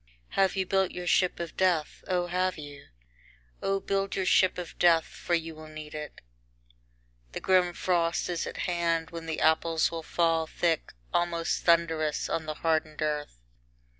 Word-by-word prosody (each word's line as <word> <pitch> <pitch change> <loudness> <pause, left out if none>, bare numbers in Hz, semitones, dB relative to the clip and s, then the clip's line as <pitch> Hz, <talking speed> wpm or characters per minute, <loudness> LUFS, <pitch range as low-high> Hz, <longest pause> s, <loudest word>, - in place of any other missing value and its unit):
II - - -30
Have 195 -1 +2
you 190 -1 0
built 190 0 +2
your 180 - -6
ship 180 0 +2
of 170 -1 -5
death, 175 -5 +1
O 180 -1 +1
have 185 +1 0
you? 145 -2 -10 0.7
O 195 0 0
build 195 0 -1
your 190 - 0
ship 185 0 +4
of 180 -2 -6
death, 165 -2 +5
for 175 - -2
you 165 -1 -3
will 155 0 -11
need 155 -1 -9
it. 150 -1 -7 1.1
The - - -3
grim 185 -2 +3
frost 170 -2 0
is 175 -2 -2
at - - -6
hand, 170 -2 0
when 165 -1 -7
the 160 - -2
apples 160 +1 +3
will 165 -1 -4
fall 165 0 +1
thick, 165 0 -1 0.2
almost 170 -1 0
thundrous, 165 -3 +2
on 160 -1 -2
the 155 - -3
hardened 155 -1 0
earth. 150 - -3
165 Hz, 170 wpm, -28 LUFS, 155-180 Hz, 1.1 s, death